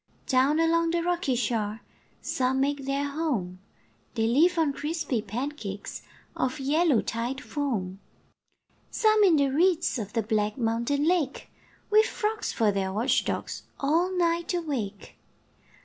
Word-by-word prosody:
Down 265 +4 +3
along 330 0 +3
the 340 0 0
rocky 350 -7 0
shore 220 -2 -1 0.4
Some 260 0 0
make 280 0 0
their 280 +1 0
home, 270 - -2 0.6
They 225 -2 +1
live 320 +10 +3
on 310 -4 +2
crispy 295 -5 -2
pancakes 225 -4 -5 0.3
Of 255 +4 -1
yellow 290 -1 +2
tide 240 +4 -3
foam; 230 -11 -3 0.9
Some 435 -1 +3
in 365 -5 +6
the 280 -2 +3
reeds 330 -1 +2
Of 205 -2 -6
the 225 -2 0
black 210 0 0
mountain 235 +4 0
lake, 330 -6 0 0.4
With 430 +1 +6
frogs 425 -1 -2
for 220 -2 +2
their 195 -1 -1
watch 220 +6 +1
dogs, - - -3 0.2
All 330 +6 +2
night 340 0 +1
awake. 250 - -4
275 Hz, 135 wpm, -27 LUFS, 230-330 Hz, 0.9 s, in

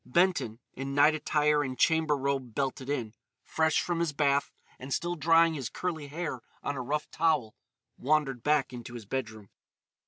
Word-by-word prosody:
Benton, 170 - +1 0.2
in 135 +1 -5
night 150 +2 +6
attire 150 -1 +2
and 130 -2 -4
chamber 160 -2 +3
robe 135 -4 -2
belted 135 -1 -2
in, 120 -7 -2 0.3
fresh 160 0 +1
from 175 -1 -2
his 170 -3 0
bath 140 -1 +1 0.3
and 130 +2 -8
still 175 +5 0
drying 165 +1 +4
his 135 -6 -4
curly 160 -5 -4
hair 150 -4 -4 0.2
on 145 - -2
a 130 - -3
rough 150 +4 -2
towel, 155 -9 +1 0.4
wandered 135 -3 +1
back 150 -1 +1
into 120 0 -8
his 115 -3 -8
bedroom. 110 -3 -5
145 Hz, 165 wpm, -29 LUFS, 130-160 Hz, 0.4 s, night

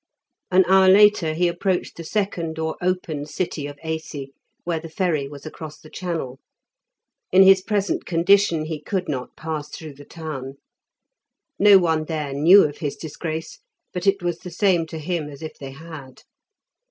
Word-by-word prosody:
An 185 0 +5
hour 190 0 +6
later 195 -5 +5
he 175 +2 +2
approached 180 +1 -1
the 165 - -8
second 170 -3 -2
or 160 0 -2
open 175 -5 -2
city 155 -3 -3
of 145 0 -9
Aisi, 160 -4 -5 0.3
where 170 -2 -1
the 165 +1 -9
ferry 160 -5 -1
was 140 +1 -11
across 155 -1 -9
the 155 - -16
channel. 160 -8 -4 0.9
In 190 +1 +7
his 190 0 +7
present 200 0 -1
condition 170 -1 +3
he 155 -1 -5
could 185 +3 -3
not 130 -3 -4
pass 155 -2 -5
through 155 -1 -9
the 140 +1 -14
town. 140 -5 -7 1.0
No 205 -1 +8
one 160 -4 +1
there 150 -3 -3
knew 170 +8 +7
of 145 -1 -3
his 145 -3 -3
disgrace, 160 +1 -6 0.3
but 180 +1 -3
it 195 -2 +2
was 175 -1 -2
the 180 - -8
same 175 -2 +1
to 160 - -7
him 155 -1 -3
as 145 +2 -11
if 155 - -8
they 135 - -7
had. 140 -2 -11
160 Hz, 170 wpm, -22 LUFS, 150-185 Hz, 1.0 s, No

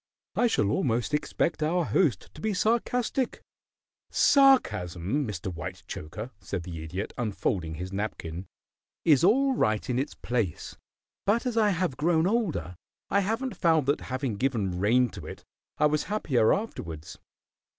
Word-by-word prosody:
"I 245 - +3
shall 105 - +1
almost 120 +2 0
expect 155 +2 0
our 170 +3 +2
host 160 -6 +1
to - - -11
be 215 -2 0
sarcastic." 240 +4 0 0.7
"Sarcasm, 140 - +3
Mr. 95 -2 -4
Whitechoker," 95 +4 -7
said 95 -4 -4
the 80 -2 -6
Idiot, 90 +6 -5
unfolding 95 -7 -1
his 90 +4 -6
napkin, 95 -4 -4 0.6
"is 150 -4 +5
all 265 +8 +4
right 110 - +1
in 125 0 0
its 140 +3 -3
place, 115 -9 -2 0.5
but 225 +5 +2
as 245 -2 -1
I 220 -2 +4
have 175 -8 -1
grown 160 +1 +2
older 180 - 0 0.4
I 200 - +4
haven't 225 +6 -1
found 160 -5 +3
that 145 +2 +1
having 130 -4 -2
given 105 -8 0
rein 120 +5 +3
to - - -9
it - - -9 0.3
I 150 - +3
was 150 0 +2
happier 145 - +2
afterwards. 85 - -4
130 Hz, 145 wpm, -28 LUFS, -, 0.7 s, is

